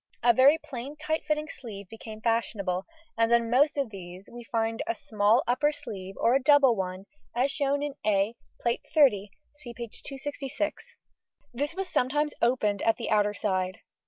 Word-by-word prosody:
A 240 0 +6
very 270 +6 +6
plain 275 -2 -7
tight 310 +1 -2
fitting 305 0 0
sleeve 210 -9 -9
became 220 +1 -10
fashionable, 205 -5 -1 0.3
and 230 0 +3
on 235 -1 +3
most 290 +5 +4
of 275 -5 -1
these 185 0 -10
we 240 0 -8
find 225 0 -1
a 345 - 0
small 215 +4 +2
upper 295 +5 +2
sleeve 195 -9 -8
or 235 - +3
a 270 - +3
double 275 -3 +6
one 190 -1 -4 0.3
as 260 +3 +2
shown 280 0 0
in 290 -1 -3
A, 205 +1 +2 0.3
Plate 235 0 0
XXX 210 -10 +4 0.2
(see 260 -5 -9
p. 235 -1 -5
266); 290 - -5 0.6
this 290 +6 -2
was 385 0 -3
sometimes 295 +1 +1
opened 215 -5 +2
at 225 - +2
the 230 - -4
outer 210 -1 +3
side. 185 -3 -1
240 Hz, 170 wpm, -28 LUFS, 210-285 Hz, 0.6 s, A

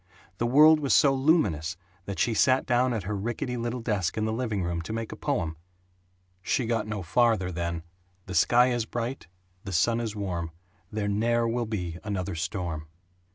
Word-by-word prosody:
The 120 - +1
world 155 +5 +7
was 140 -3 +2
so 140 -2 +5
luminous 105 - +1 0.3
that 100 - -5
she 120 - +1
sat 130 +4 +3
down 125 0 +2
at 110 -5 -2
her 105 +3 -3
rickety 120 +5 -3
little 120 +1 -3
desk 100 -7 -1
in 110 - 0
the 110 - -1
living 110 -5 -1
room 85 -1 -2
to 85 - -6
make 115 -1 -4
a - - -6
poem. 80 -1 -2 0.8
(She 120 +6 0
got 115 -2 -1
no 105 -3 -4
farther 110 -1 +2
than 85 -1 -3 0.4
"The 95 - -7
sky 120 +9 +4
is 120 -2 0
bright, 120 -4 -4 0.4
the 95 - -6
sun 115 +8 +2
is 110 -3 -3
warm, 85 -5 -3 0.4
there 105 -1 -2
ne'er 115 +3 +1
will 120 0 -1
be 90 -6 -4
another 100 -3 -3
storm.") 80 -2 -4
110 Hz, 185 wpm, -27 LUFS, 90-120 Hz, 0.8 s, world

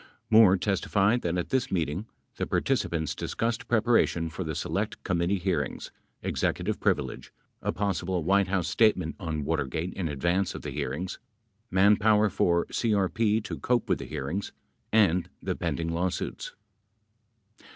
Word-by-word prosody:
Moore 110 -4 +7
testified 100 +4 +1
that 85 +1 -1
at 90 - -2
this 130 -2 0
meeting 85 +3 -1 0.3
the - - -2
participants 80 -2 0
discussed 115 0 -2
preparation 110 -8 +2
for 95 - -4
the 80 -2 -4
Select 105 +7 -3
Committee 85 +2 +1
hearings, 85 -7 -2 0.3
executive - - -1
privilege, 65 -4 -1 0.3
a - - 0
possible 95 -3 -1
White 100 +3 +3
House 90 -2 0
statement 95 -5 +2
on 80 -5 -3
Watergate 80 +3 -2
in 90 -4 -2
advance 85 +6 0
of - - -7
the - - -4
hearings, 85 +9 -4 0.5
manpower 105 +2 +4
for 85 -1 +2
CRP 105 0 +1
to - - -6
cope 120 -1 +1
with - - +1
the - - -6
hearings, 75 +6 -4 0.4
and 95 -5 +3
the - - -3
pend - - -2
ing 85 0 -2
lawsuits. 90 +2 -3
95 Hz, 140 wpm, -28 LUFS, 85-105 Hz, 0.5 s, Moore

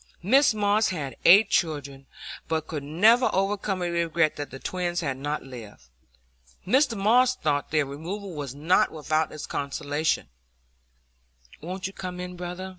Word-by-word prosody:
Mrs 260 +4 +4
Moss 210 +1 +2
had 150 -7 -4
eight 200 +4 +7
children, 140 -5 -1 0.4
but 160 -1 -1
could 155 -3 -5
never 210 - +4
overcome 195 0 -1
her 175 -1 -1
regret 170 -2 +1
that 145 - -6
the 135 - -9
twins 175 +3 -3
had 140 -5 -2
not 145 +3 -4
lived. 115 - -11 0.8
Mr 255 +2 +2
Moss 245 +6 +4
thought 145 - -1
their 155 -2 +1
removal 175 +8 -6
was 140 -4 -6
not 160 +6 +2
without 155 0 -1
its 155 - -7
consolations. 145 - -2 1.3
"Won't 185 +4 -6
you 195 - -4
come 180 -2 -6
in, 180 0 -6
brother?" 180 +1 -6
170 Hz, 150 wpm, -26 LUFS, 145-195 Hz, 1.3 s, eight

